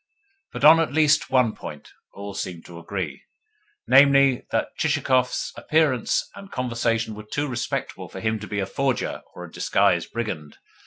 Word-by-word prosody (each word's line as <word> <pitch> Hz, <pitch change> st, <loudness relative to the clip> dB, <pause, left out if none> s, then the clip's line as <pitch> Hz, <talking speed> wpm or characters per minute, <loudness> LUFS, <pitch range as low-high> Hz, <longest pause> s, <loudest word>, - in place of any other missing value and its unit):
But -, -, -7 dB
on 160 Hz, +2 st, +9 dB
at 165 Hz, -, 0 dB
least 155 Hz, 0 st, +3 dB
one 125 Hz, -4 st, +3 dB
point -, -, -9 dB, 0.2 s
all 100 Hz, 0 st, -8 dB
seemed 90 Hz, -3 st, -6 dB
to 85 Hz, -1 st, -10 dB
agree 85 Hz, -5 st, -5 dB, 0.6 s
namely, 140 Hz, -1 st, +5 dB
that -, -, -2 dB
Chichikov's 125 Hz, -1 st, +1 dB
appearance 155 Hz, -7 st, +1 dB
and 200 Hz, 0 st, -12 dB
conversation 115 Hz, -3 st, -1 dB
were 105 Hz, -, -8 dB
too 145 Hz, 0 st, -1 dB
respectable 120 Hz, -2 st, -4 dB
for -, -, -8 dB
him 110 Hz, 0 st, -1 dB
to 105 Hz, -, -8 dB
be 105 Hz, -, -4 dB
a 95 Hz, -, 0 dB
forger 130 Hz, +4 st, -2 dB
or -, -, -8 dB
a -, -, -14 dB
disguised -, -, +1 dB
brigand. 95 Hz, -11 st, -5 dB
120 Hz, 160 wpm, -24 LUFS, 105-140 Hz, 0.6 s, on